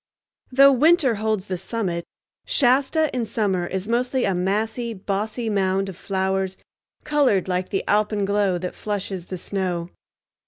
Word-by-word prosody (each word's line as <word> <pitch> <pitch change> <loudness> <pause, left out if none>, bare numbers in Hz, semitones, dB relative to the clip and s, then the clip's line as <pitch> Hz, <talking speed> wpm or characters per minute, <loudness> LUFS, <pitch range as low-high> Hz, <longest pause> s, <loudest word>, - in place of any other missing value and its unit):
Though 275 +2 +7
winter 295 0 +4
holds 215 -2 -1
the 185 -3 -4
summit, 185 -4 -3 0.4
Shasta 280 +3 +2
in 245 - 0
summer 195 -5 0
is 190 +2 -4
mostly 250 +2 +1
a 195 - +1
massy, 220 +6 -1
bossy 210 +4 -3
mound 195 -2 +1
of 190 - -8
flowers 190 0 -1 0.5
colored 280 - +2
like 180 0 -1
the 195 - -1
alpenglow 205 -2 +1
that 180 - -4
flushes 195 -4 -4
the 185 - -5
snow. 180 -2 -3
200 Hz, 135 wpm, -23 LUFS, 190-235 Hz, 0.5 s, Though